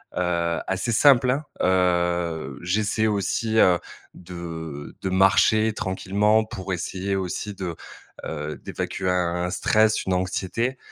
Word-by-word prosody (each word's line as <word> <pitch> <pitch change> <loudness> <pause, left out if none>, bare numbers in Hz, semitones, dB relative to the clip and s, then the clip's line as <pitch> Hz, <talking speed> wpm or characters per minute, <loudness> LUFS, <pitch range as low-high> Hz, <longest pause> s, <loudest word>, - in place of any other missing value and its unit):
heu 85 -1 0
assez 95 +5 -1
simple, 130 +1 +5
hein. 145 +4 -1 0.2
Heu, 85 -5 +1
j'essaie 105 +4 0
aussi, 110 +2 -1
heu, 90 -4 +5 0.3
de 80 -4 -8
de 95 - -2
marcher 105 +3 +4
tranquillement 105 +2 +1
pour 95 -4 -6
essayer 95 +2 -3
aussi 95 +2 -3
de, 90 -3 -4 0.5
heu, 75 -1 -5
d'évacuer 95 - -3
un 90 -1 0
un - - -2
stress, 110 +3 +2
une 95 - 0
anxiété. 95 +7 -1
95 Hz, 125 wpm, -24 LUFS, 85-110 Hz, 0.5 s, simple